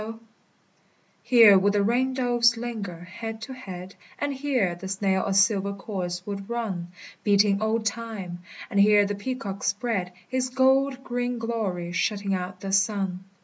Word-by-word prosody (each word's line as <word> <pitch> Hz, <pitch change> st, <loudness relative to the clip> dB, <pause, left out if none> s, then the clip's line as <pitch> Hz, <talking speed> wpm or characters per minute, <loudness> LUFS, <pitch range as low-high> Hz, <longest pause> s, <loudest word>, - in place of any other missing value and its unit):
= -, -, -38 dB
Here 225 Hz, -5 st, +8 dB
would 200 Hz, +2 st, +2 dB
the 205 Hz, -1 st, +2 dB
ring 255 Hz, +4 st, +1 dB
doves 240 Hz, -2 st, +3 dB
linger, 215 Hz, -8 st, -5 dB
head 225 Hz, +5 st, -7 dB
to 260 Hz, -, -7 dB
head; 190 Hz, -7 st, -8 dB, 0.2 s
And 285 Hz, -1 st, -2 dB
here 260 Hz, -9 st, 0 dB
the 175 Hz, +2 st, -8 dB
snail 190 Hz, 0 st, 0 dB
a 195 Hz, -, 0 dB
silver 200 Hz, 0 st, +3 dB
course 180 Hz, -3 st, -5 dB
would 200 Hz, 0 st, -6 dB
run, 215 Hz, -8 st, -3 dB, 0.4 s
Beating 200 Hz, 0 st, +3 dB
old 220 Hz, 0 st, 0 dB
Time; 210 Hz, -5 st, -4 dB, 0.3 s
and 200 Hz, -, +1 dB
here 205 Hz, 0 st, +6 dB
the 205 Hz, -, -2 dB
peacock 200 Hz, -2 st, -5 dB
spread 200 Hz, -3 st, -1 dB, 0.2 s
His 255 Hz, 0 st, -1 dB
gold 265 Hz, +1 st, +2 dB
green 245 Hz, -1 st, -2 dB
glory, 210 Hz, -7 st, -3 dB
shutting 200 Hz, +2 st, -1 dB
out 185 Hz, 0 st, -4 dB
the 195 Hz, -, -4 dB
sun. 195 Hz, -2 st, 0 dB
205 Hz, 155 wpm, -26 LUFS, 195-240 Hz, 0.4 s, Here